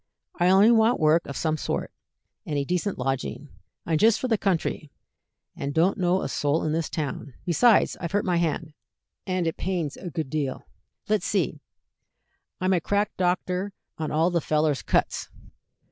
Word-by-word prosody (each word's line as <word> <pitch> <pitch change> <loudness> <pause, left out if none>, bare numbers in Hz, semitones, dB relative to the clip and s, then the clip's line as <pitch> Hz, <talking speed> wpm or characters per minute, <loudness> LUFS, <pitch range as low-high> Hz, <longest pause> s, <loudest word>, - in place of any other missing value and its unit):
"I 175 +1 +4
only 195 +4 +6
want 230 +1 +4
work 160 +1 +3
of 140 - -5
some 155 -1 0
sort, - - -3 0.5
and 145 - -3
a 140 - +1
decent 180 +6 -1
lodging. 135 +3 -3 0.4
I'm 160 -2 +1
just 225 0 +5
from 255 - -2
the 225 - +3
country, 165 -5 -1 0.7
and 140 0 -4
don't 180 +6 +3
know 180 +1 +2
a - - -1
soul 145 +1 0
in 155 - 0
this 160 0 -1
town; 140 -4 -4
besides, 215 +7 +4
I've 170 - -3
hurt 205 +1 0
my 180 -2 +1
hand, 160 -2 -1 0.5
and 185 -2 0
it 165 - -2
pains 175 -6 -2
a 180 - -6
good 155 -4 -4
deal." 145 -4 -2 0.4
"Let's - - +1
see. - - -1 1.0
I'm 185 +1 +2
a 175 - +2
crack 205 +4 0
doctor 185 +2 -1 0.3
on 155 - -2
all 160 +4 +2
the 170 -1 +1
fellers' 155 -2 +1
cuts." - - 0
170 Hz, 175 wpm, -25 LUFS, 155-190 Hz, 1.0 s, only